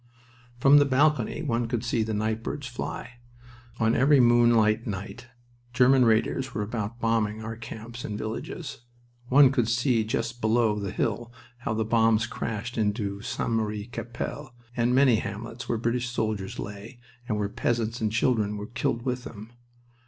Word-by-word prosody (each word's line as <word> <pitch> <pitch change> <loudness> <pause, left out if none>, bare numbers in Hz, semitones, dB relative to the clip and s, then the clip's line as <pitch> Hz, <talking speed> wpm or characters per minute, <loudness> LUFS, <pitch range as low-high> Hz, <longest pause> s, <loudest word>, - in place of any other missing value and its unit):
From 140 +3 +7
the 145 - +4
balcony 150 +3 +2
one 120 -5 0
could 120 0 -2
see 115 -1 0
the 110 0 -1
nightbirds 110 +6 -2
fly. 120 0 -6 0.6
On 115 0 +3
every 140 +2 +5
moonlight 120 -2 +4
night 100 +4 -6 0.5
German 130 0 +5
raiders 120 +3 +1
were 105 - 0
about 110 +1 -4
bombing 110 -2 0
our 110 +1 -5
camps 115 +1 -8
and 105 - -4
villages. 110 +1 -5 0.5
One 135 +1 +6
could 120 -5 +1
see 120 -1 +2
just 115 +2 -3
below 110 -1 +2
the 100 -1 -3
hill 115 +4 -2 0.3
how 115 -2 -2
the 110 0 0
bombs 110 0 +3
crashed 115 +1 -4
into 105 -2 -1
St. 115 - -3
Marie 105 -2 -1
Capelle 120 +3 -6 0.2
and 120 +1 +2
many 130 -4 +5
hamlets 115 +5 -6
where 115 - +1
British 120 +2 -1
soldiers 110 -5 -2
lay, 105 +5 -7 0.3
and 105 - 0
where 105 -1 0
peasants 115 +2 -1
and 110 -1 0
children 110 -3 +1
were 105 - -5
killed 120 +1 -2
with 125 -1 -2
them. 110 +1 -10
115 Hz, 160 wpm, -26 LUFS, 110-120 Hz, 0.6 s, From